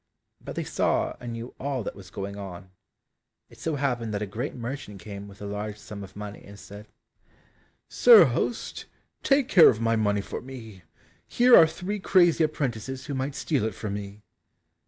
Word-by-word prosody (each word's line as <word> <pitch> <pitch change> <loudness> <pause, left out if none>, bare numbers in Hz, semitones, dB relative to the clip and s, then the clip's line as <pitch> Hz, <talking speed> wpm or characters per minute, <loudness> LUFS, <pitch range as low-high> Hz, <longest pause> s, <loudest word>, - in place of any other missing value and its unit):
But - - -7
they - - -2
saw - - 0
and 120 -1 -6
knew 115 +1 -7
all 135 -3 -2
that - - -5
was 95 -2 -12
going 100 0 -6
on. 95 -2 -9 0.8
It - - -17
so 160 -2 -2
happened 120 -6 -1
that 100 - -2
a - - -2
great 115 +8 -5
merchant 120 -4 -6
came 100 0 -8
with 100 0 -12
a - - -5
large 105 +1 -5
sum 105 -1 -9
of 95 - -12
money, 105 0 -8
and 100 0 -13
said, 100 +2 -11 1.0
"Sir 475 -2 +8
host, - - -2 0.4
take 275 -2 +3
care 180 -9 +8
of 110 - 0
my 115 0 +1
money 105 -2 +1
for - - -6
me, 115 -7 -10 0.5
here 245 0 +6
are 160 - +8
three 180 +6 -5
crazy 175 -4 +4
apprentices 130 -4 -3
who 145 - -5
might 135 +1 -3
steal 145 -8 -1
it 110 -3 -2
from 105 -2 -5
me." 100 +1 -7
115 Hz, 185 wpm, -26 LUFS, 100-140 Hz, 1.0 s, Sir